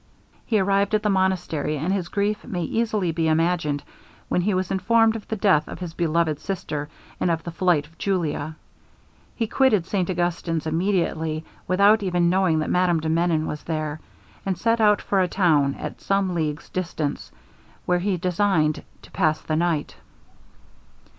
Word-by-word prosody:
He 220 - +2
arrived 200 +2 +2
at 210 - 0
the 210 - +2
monastery, 180 -5 0
and 165 +7 -1
his 185 -3 -1
grief 205 +2 -1
may 180 -7 -3
easily 215 -2 0
be 165 0 0
imagined, 160 -2 +1 0.5
when 180 - +1
he 195 +2 +1
was 185 -1 -1
informed 225 +4 +3
of 220 - -7
the 220 - -2
death 185 -7 +3
of - - -7
his 175 -3 -6
beloved 165 -2 0
sister, 150 -6 -4 0.3
and - - +1
of 165 -1 0
the 170 - -5
flight 170 -3 +2
of 165 +2 -22
Julia. 160 -5 -1 0.8
He 230 - 0
quitted 220 -6 +2
St 185 -2 -1
Augustin's 175 -2 -1
immediately, 160 -2 -1 0.2
without 200 +4 +5
even 175 -3 +2
knowing 185 -4 +2
that 155 - -1
Madame 180 -2 +3
de 160 0 -3
Menon 165 -1 +1
was 150 - -4
there, 155 -2 -3 0.4
and 190 -2 -1
set 230 +4 +1
out 210 -1 +4
for 195 -2 +1
a 180 - +2
town 155 -7 +2
at - - -7
some 195 -2 +1
leagues 155 -2 -2
distance, 165 -5 -3 0.5
where 180 0 +2
he 190 0 0
designed 180 -3 +1 0.2
to - - -15
pass 155 -4 +1
the 155 - -2
night. 165 -2 -1
175 Hz, 170 wpm, -24 LUFS, 160-195 Hz, 0.8 s, without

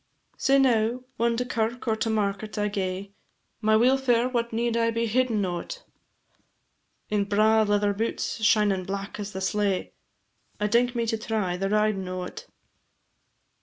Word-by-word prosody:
Sae 275 +1 +3
now, 245 -2 +2
whan 235 0 +1
to 250 - -1
kirk 235 0 -2
or 220 - +2
to 220 +1 -2
market 210 0 -2
I 210 0 0
gae 195 0 -3 0.5
My 215 0 +3
weelfare 250 +1 +3
what 235 -1 0
need 230 +1 0
I 230 0 +2
be 230 0 0
hiddin' 225 -3 +1
o't? 185 - -5 1.3
In 205 -1 +1
braw 215 +2 +3
leather 205 -1 +2
boots 220 +1 -3
shinin' 210 -3 +3
black 200 +2 -5
as 205 0 -5
the 190 - -6
slae, 200 -1 0 0.7
I 210 - 0
dink 240 +3 +2
me 235 -1 0
to 225 -1 -1
try 215 -5 -1
the 195 +2 -2
ridin' 210 -2 +1
o't. 185 - -6
215 Hz, 155 wpm, -26 LUFS, 200-235 Hz, 1.3 s, Sae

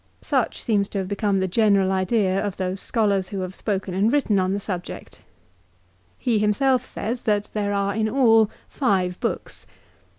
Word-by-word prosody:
Such - - 0
seems 205 -3 +1
to - - -5
have 190 -1 -2
become 200 0 0
the 190 - +1
general 200 -1 +3
idea 190 0 +1
of 205 -3 -3
those 185 +1 -2
scholars 200 -5 +1
who 195 -2 -4
have 185 0 -4
spoken 195 -2 -3
and 200 +5 +2
written 255 -8 +2
on 185 0 +1
the 200 - -1
subject. 185 -3 -7 1.0
He 235 -4 +1
himself 250 +5 +2
says 240 +2 -4
that 210 -2 +1
there 205 -1 -1
are 200 0 0
in 220 +1 0
all 225 -4 +4 0.2
five 185 -9 0
books. - - -3
200 Hz, 170 wpm, -23 LUFS, 190-220 Hz, 1.0 s, all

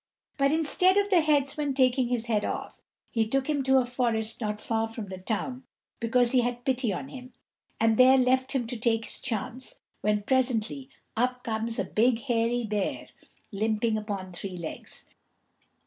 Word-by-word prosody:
But 275 0 +2
instead 330 +5 +4
of 405 0 +2
the 355 -3 +6
headsman 290 -2 +1
taking 255 -1 +3
his 240 -2 -1
head 215 -3 +1
off, - - -5 0.3
he 225 -2 +1
took 270 +3 0
him 295 -2 +1
to 265 0 +4
a 255 - +3
forest 235 -2 -1
not 210 -1 -2
far 225 0 -1
from 225 -3 -7
the 185 -1 -7
town, 245 +6 -3 0.4
because 240 +1 +2
he 255 - +4
had 245 0 -3
pity 255 -4 +1
on 195 +9 -5
him, 255 -1 -10 0.5
and 225 -1 +3
there 260 +1 +7
left 260 +1 +2
him 260 -3 0
to 235 +1 -5
take 225 0 +1
his - - -3
chance, 250 +1 -3 0.3
when 210 0 +1
presently 260 +1 0 0.3
up 250 +2 0
comes 225 0 -2
a - - +1
big 235 +1 +2
hairy 240 -1 0
bear, 210 -3 -2 0.4
limping 215 +2 0
upon 200 -4 -4
three 185 +1 -5
legs. 170 -2 -6
240 Hz, 175 wpm, -27 LUFS, 220-260 Hz, 0.5 s, there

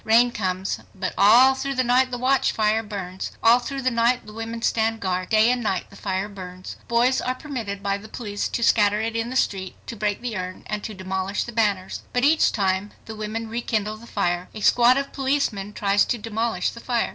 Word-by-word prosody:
Rain 235 +2 +5
comes, 190 -3 -2 0.2
but 185 -1 -3
all 235 +7 +7
through 275 +1 -3
the 255 - +2
night 255 +1 +3
the 245 - -3
watchfire 240 -4 +2
burns. 195 -4 -6
All 235 +2 +7
through 270 +2 -5
the 255 - +2
night 235 +2 +2
the 210 - -11
women 225 +1 -6
stand 225 0 +1
guard. 185 -2 -2
Day 220 +2 +5
and 250 -1 0
night 195 -5 -2
the - - -14
fire 190 0 -2
burns. 185 -2 -9
Boys 240 +2 +2
are 255 +1 -1
permitted 230 -9 -5
by 200 0 0
the 215 - -11
police 205 -4 -3
to 235 - -2
scatter 210 -2 +4
it 225 +1 -2
in 230 +1 -1
the 255 - -5
street, 190 -7 -1
to 235 - -6
break 205 -1 -1
the. 240 -2 -4
urn, 185 -1 -5
and 210 -1 -4
to 215 - -6
demolish 190 +1 -2
the 235 - -7
banners. 205 -5 0
But 245 0 +1
each 310 +3 +4
time 195 0 -1
the 220 - -7
women 215 +1 -4
rekindle 220 -2 -2
the 230 +2 -14
fire. 175 -4 -1
A 215 - -6
squad 245 +4 +5
of 275 0 -3
policemen 265 -8 -1
tries 205 -1 +2
to 240 - -1
demolish 225 +1 -1
the 235 - -10
fire. 240 -1 0
220 Hz, 215 wpm, -24 LUFS, 200-240 Hz, 0.2 s, all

